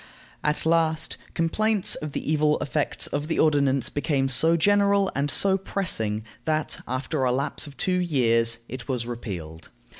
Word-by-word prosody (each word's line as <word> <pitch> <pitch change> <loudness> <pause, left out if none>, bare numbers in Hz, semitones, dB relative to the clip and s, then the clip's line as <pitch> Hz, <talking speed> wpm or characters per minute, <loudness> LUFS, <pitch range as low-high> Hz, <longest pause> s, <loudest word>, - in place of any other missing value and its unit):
At 150 +1 0
last, 160 -1 +1 0.2
complaints 210 +5 +2
of 150 -2 -4
the - - -3
evil 150 -1 +2
effects 145 +1 -1
of 145 +1 -3
the 160 - -2
ordinance 140 -4 +2
became 145 -2 0
so 160 +6 +5
general 200 +2 +3
and 140 +2 -1
so 195 +5 +2
pressing 110 - -2 0.2
that, 155 -1 -1
after 130 +3 -2
a 125 - +2
lapse 140 +4 -1
of 140 - -13
two 180 -1 0
years, 115 -8 +2
it 130 0 -8
was 125 -4 -2
repealed. 90 -10 -7
145 Hz, 155 wpm, -25 LUFS, 130-165 Hz, 0.2 s, so